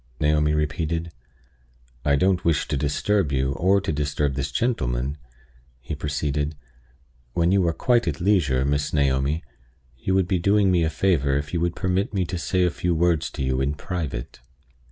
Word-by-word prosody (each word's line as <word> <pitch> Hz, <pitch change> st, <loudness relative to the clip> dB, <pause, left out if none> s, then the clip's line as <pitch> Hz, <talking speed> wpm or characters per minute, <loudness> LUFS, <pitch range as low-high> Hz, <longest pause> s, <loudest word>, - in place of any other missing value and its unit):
Naomi 75 Hz, 0 st, +2 dB
repeated. 80 Hz, +2 st, -2 dB, 0.9 s
"I 70 Hz, -1 st, +3 dB
don't 90 Hz, +4 st, +2 dB
wish 85 Hz, -2 st, +1 dB
to 75 Hz, -, 0 dB
disturb 75 Hz, +5 st, 0 dB
you, 65 Hz, 0 st, +1 dB
or 95 Hz, +8 st, +2 dB
to 95 Hz, -, -2 dB
disturb 75 Hz, -1 st, -1 dB
this 70 Hz, +2 st, -3 dB
gentleman," 65 Hz, -, -1 dB, 0.6 s
he 65 Hz, +6 st, -6 dB
proceeded. 75 Hz, 0 st, -2 dB, 0.8 s
"When 85 Hz, +1 st, +2 dB
you 95 Hz, -3 st, +3 dB
are -, -, +3 dB
quite 120 Hz, +2 st, +2 dB
at 75 Hz, -, -1 dB
leisure, 80 Hz, -9 st, +2 dB
Miss 70 Hz, 0 st, 0 dB
Naomi, 70 Hz, +2 st, +1 dB, 0.6 s
you 95 Hz, -, 0 dB
would 95 Hz, -2 st, +2 dB
be 90 Hz, 0 st, +1 dB
doing 100 Hz, +2 st, +3 dB
me 85 Hz, -2 st, +3 dB
a 80 Hz, -, +1 dB
favor 75 Hz, -5 st, +1 dB
if 70 Hz, +3 st, -5 dB
you 85 Hz, -, +1 dB
would 85 Hz, 0 st, 0 dB
permit 95 Hz, +4 st, -1 dB
me 95 Hz, -2 st, +1 dB
to 90 Hz, +1 st, -4 dB
say 90 Hz, +2 st, +1 dB
a 90 Hz, -, +2 dB
few 90 Hz, 0 st, -1 dB
words 85 Hz, -1 st, +1 dB
to -, -, -5 dB
you 65 Hz, 0 st, 0 dB
in 70 Hz, +2 st, 0 dB
private." 75 Hz, -9 st, -5 dB
80 Hz, 175 wpm, -24 LUFS, 70-90 Hz, 0.9 s, I